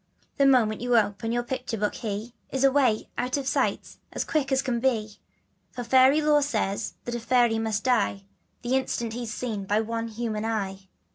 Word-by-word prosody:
The 275 - +5
moment 230 -5 +3
you 245 -1 +3
open 205 +1 0
your 240 +1 0
picture 250 -2 -4
book 210 0 -1
he 220 +1 -5 0.2
Is 265 0 -1
away 265 -5 +3
out 250 +3 0
of 280 - -3
sight - - -1
as - - -2
quick 290 -3 -1
as 265 0 +2
can 245 -3 -1
be, 220 -5 -1 0.5
For 245 - -5
fairy 260 +5 +5
law 300 -1 +4
says 240 -8 -2
that 240 - -4
a 240 - -2
fairy 235 -1 +2
must 220 -1 -1
die 225 -6 +1 0.4
The 245 +2 +1
instant 235 -3 -1
he's 235 -1 -5
seen 220 -5 -4
by 205 +2 +1
one 230 +1 -3
human 220 -1 -3
eye. 195 -4 -3
235 Hz, 190 wpm, -26 LUFS, 215-260 Hz, 0.5 s, The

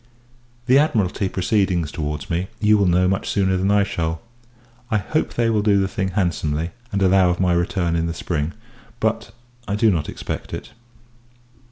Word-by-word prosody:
The 130 +2 +5
Admiralty 105 - +1
proceedings 95 -5 0
towards 75 -3 -4
me, 85 +3 -1
you 105 -1 +4
will 100 -2 +3
know 90 +1 +3
much 95 +1 -1
sooner 95 -2 +1
than 95 +2 0
I 100 0 +4
shall. 80 -5 -2 0.7
I 110 - +2
hope 155 +10 -2
they 120 -1 +2
will 110 -2 +2
do 100 -1 +3
the 95 - +1
thing, 95 0 -2
handsomely, 85 -4 -1 0.2
and 100 -1 0
allow 95 -1 +4
of 90 - -1
my 90 -2 +2
return 85 0 0
in 85 0 0
the 85 - -3
spring; 80 -1 -2 0.5
but, 110 -1 -1 0.4
I 100 - -1
do 110 +1 +4
not 80 -5 -1
expect - - -5
it. - - -9
95 Hz, 180 wpm, -21 LUFS, 85-100 Hz, 0.7 s, The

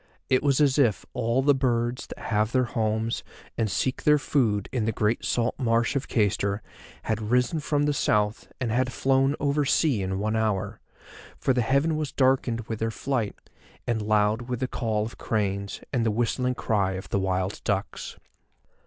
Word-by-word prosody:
It 130 - +4
was 140 -1 +2
as 145 -1 +3
if 120 -8 +2
all 120 +2 +1
the 145 +1 +5
birds 120 -2 0
that - - -9
have 110 0 0
their 130 -1 +3
homes 110 -2 -1 0.3
and 110 -2 0
seek 125 +7 -1
their 150 0 +5
food 115 -9 +1
in 120 -5 -1
the 115 - +1
great 110 +1 0
salt 120 0 0
marsh 115 0 +1
of 140 - -1
Cayster 100 -1 0 0.4
had 110 0 -1
risen 125 +6 +2
from 145 -1 0
the 145 0 +2
South 105 -5 0
and 125 -4 -1
had 130 +2 +1
flown 135 +2 +2
over 145 +1 +1
sea 140 -5 +2
in 95 0 -2
one 110 +2 -1
hour, 110 -3 -1 0.6
for 130 - +1
the 125 - +1
heaven 140 +6 +2
was 155 -2 -2
darkened 130 -3 +2
with 110 -1 -5
their 115 - 0
flight, 115 -2 -2 0.5
and 115 -2 0
loud 105 +3 +1
with 125 -2 -2
the 130 - +1
call 110 -4 -1
of 115 - -9
cranes 100 -2 -2
and 120 -3 +2
the 115 - +2
whistling 120 +3 0
cry 100 -5 0
of 95 +1 -7
the 100 - +1
wild 95 0 -1
ducks. 100 -1 -3
115 Hz, 185 wpm, -26 LUFS, 105-130 Hz, 0.6 s, the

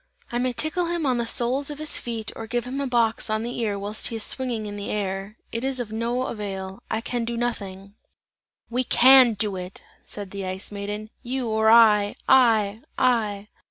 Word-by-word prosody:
I 240 - -1
may 255 0 +1
tickle 320 +7 0
him 340 -2 -1
on 255 -3 +1
the 235 - -1
soles 255 +5 +1
of 295 - -5
his 305 0 0
feet 225 -2 -4
or 225 - -7
give 240 +1 -2
him 265 +3 -4
a 280 - -1
box 230 -3 +1
on 215 +1 0
the 240 +1 -4
ear 210 -3 -1
whilst 205 +2 -2
he 230 - -5
is 220 - -1
swinging 245 -5 -1
in 205 0 -6
the 205 0 -5
air, 195 +1 -3
it 230 +2 -3
is 265 -1 -1
of 230 -3 -4
no 235 +3 -1
avail. 195 -3 -5
I 220 - -1
can 240 0 -3
do 235 0 -3
nothing!" 200 -5 -4 0.7
"We 250 +2 -1
can 255 -1 +7
do 205 -2 0
it!" 180 +1 -8 0.2
said 200 -2 -7
the 195 -1 -5
Ice 185 +2 -3
Maiden. 205 +1 -5
"You 250 -1 -3
or 220 0 +3
I! 215 -3 +6
I! 225 -5 +4 0.2
I!" 215 -5 +1
225 Hz, 205 wpm, -24 LUFS, 205-245 Hz, 0.7 s, can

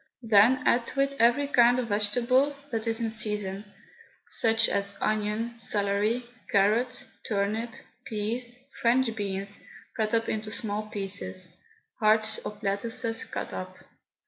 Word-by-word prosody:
Then 230 +4 +5
add 235 0 +3
to 275 - -1
it 275 0 0
every 240 +5 +4
kind 245 -3 +5
of 245 -2 -2
vegetable 245 +7 +2 0.2
that 225 -1 -2
is 225 +1 +1
in 225 -1 0
season, 210 -2 -1 0.6
such 225 0 +3
as 200 0 -1
onion, 215 +2 -1
celery, 210 +3 0 0.2
carrot, 220 +6 +2 0.2
turnip, 215 +3 -1 0.4
peas, 235 +3 -3 0.2
French 235 -1 +3
beans, 200 -1 -3 0.3
cut 220 -1 0
up 225 0 +1
into 215 0 -3
small 215 -1 -3
pieces, 190 -3 -4 0.4
hearts 215 0 +4
of 210 - -8
lettuces 225 +3 -1
cut - - -5
up. - - -6
220 Hz, 130 wpm, -28 LUFS, 205-235 Hz, 0.6 s, Then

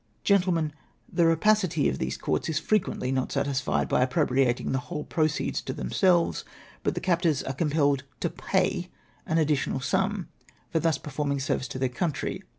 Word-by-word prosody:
Gentlemen, 180 -6 +2 0.4
the 170 -2 +4
rapacity 165 -2 +3
of 65 - -1
these 65 - -2
courts 75 - -1
is 155 - 0
frequently 170 -7 0
not 130 -1 -1
satisfied 140 -1 0
by - - +2
appropriating 130 -2 +1
the 130 - +1
ivJtole 150 +4 -6
proceeds 155 -2 0
to - - -4
themselves, 170 - +2 0.4
but - - -1
the - - -1
captors 170 -5 +1
are 135 - -3
compelled 145 -2 +1 0.2
to - - 0
jjay - - 0 0.4
an 160 - +1
additional 150 -4 +1
sum 190 +9 0 0.4
for 165 - +2
thus 160 -3 +2
performing 140 0 -2
a - - -3
service 130 0 -1
to 120 - -6
their 130 0 +1
country. 145 +5 -2
150 Hz, 165 wpm, -27 LUFS, 130-170 Hz, 0.4 s, the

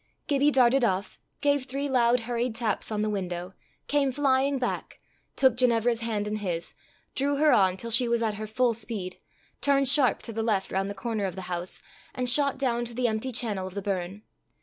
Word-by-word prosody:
Gibbie 285 0 +3
darted 260 -1 +4
off, 190 -3 -1 0.2
gave 285 -2 +2
three 275 +2 -3
loud 245 -2 +3
hurried 240 0 -2
taps 225 -2 -1
on 210 -1 0
the 215 - 0
window, 180 -2 -4 0.3
came 285 -2 +2
flying 275 0 +2
back, 250 -1 -3 0.4
took 260 -3 +4
Ginevra's 240 -2 +2
hand 220 -3 -2
in 210 +1 -2
his, 175 -5 -3 0.4
drew 285 +1 0
her 300 +1 +4
on 190 -2 +4
till 230 +3 -5
she 240 +2 +3
was 235 0 +1
at 220 -2 0
her 215 - -4
full 235 +2 +1
speed, 210 -5 -4 0.4
turned 275 -1 +3
sharp 265 -1 +3
to 230 - -5
the 225 - -2
left 210 -4 0
round 195 +1 -1
the 200 - -5
corner 220 0 -2
of 185 -2 -4
the 190 - -6
house, 175 +1 -5 0.3
and 250 -1 -1
shot 280 +2 +3
down 240 -3 0
to 235 0 -6
the 250 0 +1
empty 220 +3 -2
channel 210 -6 -2
of 190 - -10
the 200 - -3
burn. 195 +1 -3
235 Hz, 205 wpm, -27 LUFS, 205-260 Hz, 0.4 s, darted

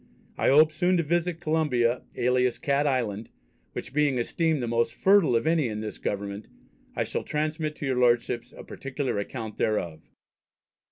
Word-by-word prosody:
I - - 0
hope 155 +3 +6
soon 180 +3 +1
to 170 - +1
visit 170 +2 0
Columba 150 -8 +1
alias 125 0 +1
Cat 140 +1 +1
Island, 115 -5 -1 0.4
which - - -6
being 145 -3 +2
esteemed 155 +3 0
the - - -2
most 115 0 0
fertile 195 -9 +4
of 115 - +1
any 160 -4 +2
in 105 -1 -4
this 110 -1 -6
government, 100 +1 -4 0.5
I - - +1
shall - - -3
transmit 155 0 -2
to 150 - -6
your 130 -2 0
Lordships 120 0 +1
a - - -11
particular 135 -4 -4
account 110 +1 -6
thereof. 85 -7 -2
130 Hz, 165 wpm, -26 LUFS, 115-155 Hz, 0.5 s, hope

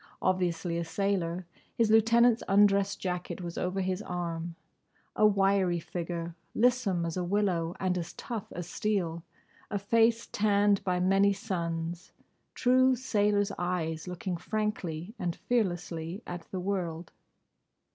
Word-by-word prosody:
Obviously 175 -2 0
a - - -1
sailor. 180 -1 -1 0.3
His 225 -3 +3
lieutenant's 230 +1 +5
undress 200 0 +4
jacket 180 0 -4
was 175 -2 -6
over 185 +2 -1
his 185 +1 -1
arm. 170 -3 -4 0.6
A 215 - +6
wiry 195 -3 +2
figure, 170 0 -4 0.2
lissome 230 -8 +2
as 165 +1 -3
a 180 - 0
willow 175 -3 0
and 185 -1 0
as 170 0 -6
tough 225 -4 -6
as 175 -1 -6
steel; 180 -5 -1 0.5
a 205 - -1
face 225 +3 +3
tanned 205 -1 +2
by 180 -2 0
many 195 +2 +4
suns; 170 -3 -4 0.4
true 255 +1 +4
sailor's 205 -4 +1
eyes 170 -2 -2
looking 180 0 -3
frankly 190 -2 -3
and 175 -2 -1
fearlessly 175 -4 -2
at 175 -1 -7
the 185 - -4
world. 180 -3 -3
185 Hz, 130 wpm, -30 LUFS, 170-205 Hz, 0.6 s, A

